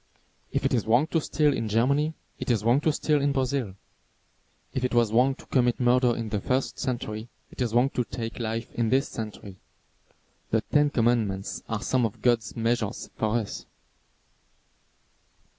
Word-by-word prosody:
If -, -, -1 dB
it -, -, +1 dB
is 115 Hz, -3 st, 0 dB
wrong 120 Hz, +6 st, +4 dB
to 165 Hz, -, +1 dB
steal 150 Hz, -1 st, +2 dB
in 110 Hz, -, -2 dB
Germany, 140 Hz, +8 st, +2 dB, 0.2 s
it -, -, -4 dB
is 115 Hz, -4 st, +2 dB
wrong 120 Hz, +5 st, +3 dB
to 155 Hz, -, +3 dB
steal 150 Hz, 0 st, +1 dB
in 140 Hz, 0 st, +1 dB
Brazil. 130 Hz, -6 st, -1 dB, 1.0 s
If 130 Hz, -, -2 dB
it 125 Hz, -1 st, 0 dB
was 115 Hz, -2 st, +3 dB
wrong 130 Hz, +3 st, +4 dB
to -, -, -15 dB
commit 125 Hz, -2 st, +1 dB
murder 125 Hz, -1 st, +3 dB
in 115 Hz, -2 st, -4 dB
the 105 Hz, -2 st, -2 dB
first 130 Hz, +4 st, -1 dB
century, 115 Hz, -3 st, -3 dB, 0.2 s
it -, -, -8 dB
is 120 Hz, -3 st, 0 dB
wrong 130 Hz, +3 st, +4 dB
to 125 Hz, -, 0 dB
take 115 Hz, 0 st, -6 dB
life 115 Hz, 0 st, -3 dB
in 115 Hz, -2 st, 0 dB
this 135 Hz, +4 st, +2 dB
century. 105 Hz, -3 st, -7 dB, 0.9 s
The 110 Hz, -, +2 dB
Ten 145 Hz, +5 st, +2 dB
Commandments 115 Hz, -6 st, 0 dB
are 110 Hz, -2 st, -2 dB
some 130 Hz, -1 st, +1 dB
of 105 Hz, -, -14 dB
God's 115 Hz, -3 st, +2 dB
measures 115 Hz, -2 st, -1 dB
for 110 Hz, +1 st, +1 dB
us. 110 Hz, -4 st, -5 dB
120 Hz, 175 wpm, -26 LUFS, 110-130 Hz, 1.0 s, wrong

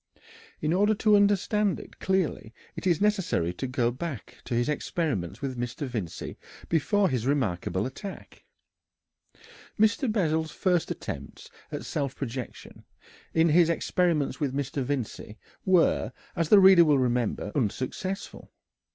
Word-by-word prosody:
In 155 Hz, +1 st, +1 dB
order 205 Hz, +4 st, +3 dB
to 210 Hz, 0 st, +4 dB
understand 205 Hz, 0 st, +2 dB
it -, -, -13 dB
clearly 180 Hz, -, -1 dB, 0.2 s
it -, -, -3 dB
is 170 Hz, -4 st, +3 dB
necessary 190 Hz, -, +1 dB
to 130 Hz, -, -4 dB
go 125 Hz, -2 st, 0 dB
back 135 Hz, -, -6 dB
to 120 Hz, -, -2 dB
his 120 Hz, +1 st, +1 dB
experiments 145 Hz, -, -2 dB
with 130 Hz, -3 st, -3 dB
Mr. 120 Hz, +4 st, -3 dB
Vincey 110 Hz, -10 st, -5 dB, 0.3 s
before 195 Hz, +5 st, +2 dB
his 125 Hz, -4 st, -1 dB
remarkable 105 Hz, -8 st, 0 dB
attack. 190 Hz, +9 st, -8 dB, 1.4 s
Mr. 225 Hz, +3 st, +3 dB
Bessel's 160 Hz, -6 st, 0 dB
first 180 Hz, +1 st, 0 dB
attempts -, -, -7 dB, 0.2 s
at -, -, -5 dB
self 140 Hz, -2 st, -2 dB
projection, 125 Hz, -2 st, -7 dB, 0.5 s
in 165 Hz, +1 st, +4 dB
his 165 Hz, +2 st, +5 dB
experiments 170 Hz, -2 st, 0 dB
with 140 Hz, -4 st, -1 dB
Mr. 140 Hz, 0 st, -2 dB
Vincey, 125 Hz, -5 st, -4 dB, 0.3 s
were, 185 Hz, -3 st, +3 dB, 0.2 s
as 165 Hz, -3 st, 0 dB
the 210 Hz, -, +8 dB
reader 190 Hz, -2 st, +8 dB
will 150 Hz, -3 st, +4 dB
remember, 120 Hz, -4 st, 0 dB
unsuccessful. 140 Hz, -, -3 dB
150 Hz, 135 wpm, -27 LUFS, 125-185 Hz, 1.4 s, the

